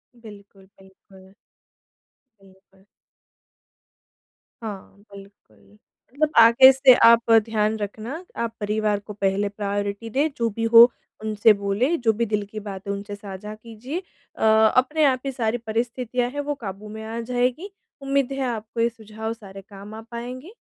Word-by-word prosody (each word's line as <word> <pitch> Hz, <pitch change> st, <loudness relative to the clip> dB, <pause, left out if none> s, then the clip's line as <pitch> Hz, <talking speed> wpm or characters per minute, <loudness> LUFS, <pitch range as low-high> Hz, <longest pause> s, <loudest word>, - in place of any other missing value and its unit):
बिल्कुल, 205 Hz, -4 st, -15 dB, 0.2 s
बिल्कुल। 190 Hz, 0 st, -19 dB, 1.1 s
बिल्कुल। 190 Hz, 0 st, -24 dB, 1.8 s
हाँ, 205 Hz, -4 st, -8 dB, 0.2 s
बिल्कुल। 195 Hz, -, -16 dB, 0.5 s
मतलब 305 Hz, +2 st, +1 dB
आगे 235 Hz, +3 st, +8 dB
से 265 Hz, -1 st, +6 dB
आप 230 Hz, 0 st, +5 dB
ध्यान 220 Hz, -1 st, 0 dB
रखना, 220 Hz, -, -6 dB
आप 230 Hz, -1 st, -3 dB
परिवार 210 Hz, 0 st, -1 dB
को 205 Hz, +1 st, -10 dB
पहले 200 Hz, 0 st, -1 dB
प्रायोरिटी 205 Hz, +1 st, -4 dB
दें, 280 Hz, +7 st, +1 dB
जो 230 Hz, -1 st, 0 dB
भी 225 Hz, +2 st, -5 dB
हो, 235 Hz, +1 st, +9 dB, 0.3 s
उनसे 215 Hz, 0 st, +4 dB
बोलें, 220 Hz, +12 st, 0 dB
जो 225 Hz, -2 st, +2 dB
भी 235 Hz, +2 st, -1 dB
दिल 205 Hz, -1 st, 0 dB
की 215 Hz, -, -6 dB
बात 200 Hz, -2 st, -8 dB
है, 200 Hz, -, -1 dB
उनसे 205 Hz, +1 st, -7 dB
साझा 200 Hz, +1 st, -9 dB
कीजिए। 230 Hz, +8 st, -7 dB, 0.4 s
अ, -, -, -5 dB
अपने 255 Hz, +8 st, +3 dB
आप 260 Hz, -2 st, +2 dB
ही 275 Hz, -, -2 dB
सारी 235 Hz, -2 st, -1 dB
परिस्थितियाँ 240 Hz, +2 st, -2 dB
हैं, 290 Hz, -, -6 dB
वो 290 Hz, 0 st, -3 dB
काबू 200 Hz, +2 st, -7 dB
में 220 Hz, +1 st, -8 dB
आ 225 Hz, +1 st, -5 dB
जाएँगी। 250 Hz, -, -2 dB, 0.3 s
उम्मीद 275 Hz, -1 st, 0 dB
है, 270 Hz, -, -4 dB
आपको 225 Hz, 0 st, -6 dB
ये 230 Hz, -, +3 dB
सुझाव 220 Hz, 0 st, -7 dB
सारे 195 Hz, -3 st, -12 dB
काम 200 Hz, +1 st, -12 dB
आ 220 Hz, -, -8 dB
पाएँगे। 250 Hz, +8 st, -7 dB
220 Hz, 150 wpm, -23 LUFS, 205-245 Hz, 1.8 s, हो